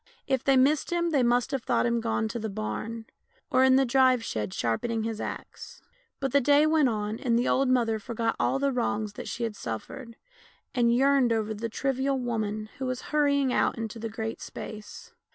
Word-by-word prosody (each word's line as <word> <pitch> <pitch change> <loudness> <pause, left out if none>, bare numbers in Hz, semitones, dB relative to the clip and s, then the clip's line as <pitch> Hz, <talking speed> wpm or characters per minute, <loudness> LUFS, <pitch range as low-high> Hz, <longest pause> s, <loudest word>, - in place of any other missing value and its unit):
If 265 -2 0
they 270 -1 +4
missed 280 +5 +3
him 345 -1 0
they 285 -4 +3
must 245 +2 +2
have 270 -3 -1
thought - - +1
him 235 -1 +1
gone 225 -1 0
to 235 - -4
the 220 0 -3
barn, 220 +2 -5 0.5
or 260 -2 +4
in 260 0 +6
the 270 0 +4
drive 255 -1 +3
shed 105 - -3
sharpening 220 - -1
his 225 -1 -3
axe. - - -7 0.4
But 270 -1 -2
the 280 - +4
day 290 +3 +5
went 310 -4 +3
on 215 0 -3
and 235 -2 +1
the 240 - +1
old 270 0 +2
mother 230 -3 +2
forgot 225 +1 -2
all - - +1
the 280 0 +1
wrongs 215 -4 -1
that - - -8
she 235 - -4
had 225 -2 -2
suffered, 225 - -7 0.6
and 240 -2 +3
yearned 265 0 +3
over 220 -1 0
the 225 +2 -4
trivial 270 +3 -1
woman 215 -3 -3
who 265 - -2
was 255 -1 -3
hurrying 280 -3 +2
out - - +1
into 225 0 -5
the 225 0 -4
Great 220 +1 -5
Space. 215 -1 -9
240 Hz, 205 wpm, -27 LUFS, 220-270 Hz, 0.6 s, in